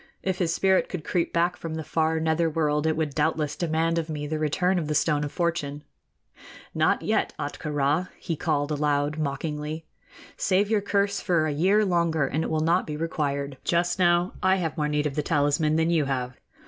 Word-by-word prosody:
If 190 -1 -1
his 170 -3 +1
spirit 190 +2 +2
could 180 -5 -5
creep 170 +2 -1
back 170 +1 +1
from 165 -1 -6
the 160 - -4
far 160 +1 0
nether 160 +1 +1
world, 150 -1 0
it 160 - +1
would 155 -3 -1
doubtless 150 0 0
demand 165 0 0
of 160 -1 -4
me 150 -1 -4
the 155 +1 -3
return 180 +5 +1
of 155 - -3
the 150 - -1
Stone 150 -1 +2
of 145 - -4
Fortune.... 150 -5 -2 0.9
Not - - +2
yet, - - 0
Ahtka 150 - -4
Rā!" 145 +5 +1
he 170 - -3
called 145 -1 -1
aloud, 145 0 0
mockingly; 150 +2 -3 0.5
"save 200 +2 +1
your 215 -2 +3
curse 200 0 0
for 170 -4 +2
a 155 - 0
year 195 +8 +3
longer, 170 -5 +1
and 155 +4 -1
it - - -3
will 155 -1 0
not 170 +3 +2
be 150 -1 -4
required. 140 -4 -2
Just 175 +2 +1
now 175 0 +3
I 185 +1 +4
have 165 -5 -2
more 150 -1 0
need 150 0 0
of 145 - -1
the 150 - 0
talisman 150 0 +1
than 160 +1 +2
you 160 -4 +2
have!" 125 -2 -2
160 Hz, 205 wpm, -26 LUFS, 150-170 Hz, 0.9 s, I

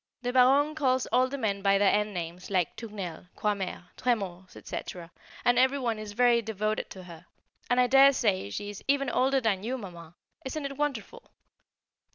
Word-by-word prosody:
The 245 0 -2
Baronne 270 +4 +4
calls 260 -4 +1
all 255 +1 +4
the 280 +2 -5
men 205 -6 -1
by 195 0 +3
their 200 -1 +4
end 210 0 +1
names 175 -1 -6
like 185 -4 0
"Tournelle," 195 -7 -7
"Croixmare," 195 -3 -3
"Trémors," 190 -7 -2 0.2
&c., 180 - -6 0.5
and 245 0 +4
every 260 +2 +3
one 235 -5 -2
is 210 -1 -7
very 240 +1 +4
devoted 215 -1 -2
to 185 - -10
her, 175 -1 -13 0.4
and 245 - +3
I 250 - +5
daresay 250 - +4
she 205 - -5
is 205 - -11
even 275 -1 +1
older 265 +1 +2
than 205 -5 0
you, 250 +4 -2
mamma; 175 -6 -10 0.3
isn't 280 +3 -4
it 275 0 -5
wonderful? 295 - -4
220 Hz, 180 wpm, -28 LUFS, 195-260 Hz, 0.5 s, I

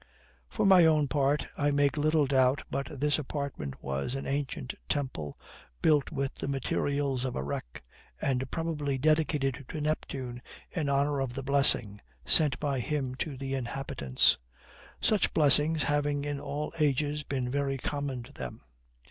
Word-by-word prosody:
For - - 0
my 190 -3 +8
own 155 -3 +4
part, 140 +1 +1
I 145 - +1
make 145 0 +2
little 155 0 +3
doubt 130 0 +3
but 140 -1 -2
this 145 +2 +2
apartment 140 - -5
was 70 - -2
an 135 - -4
ancient 140 -2 -2 0.2
temple, 130 - -2 0.5
built 150 -3 +3
with 135 -1 -2
the - - -5
materials 140 0 0
of 130 - -2
a 65 - -2
wreck, 60 -4 -5 0.4
and 130 -1 0
probably 150 -4 -2
dedicated 145 -2 +1
to 155 - -5
Neptune 135 -5 -3 0.3
in 155 -5 -1
honor 140 +1 +2
of 130 -2 -2
THE 135 - -4
BLESSING 130 -7 +3 0.2
sent 145 -6 +3
by 140 -3 -1
him 135 -1 -2
to 140 -1 -3
the 135 0 -4
inhabitants; 120 - +1 0.6
such 215 -3 +2
blessings 150 +1 +4
having 145 -1 0
in 145 -1 -2
all 145 +3 -4
ages 150 0 +1
been 130 -4 -3
very 140 0 0
common 140 -2 -3
to - - -15
them. 65 -2 -7
140 Hz, 155 wpm, -30 LUFS, 130-150 Hz, 0.6 s, my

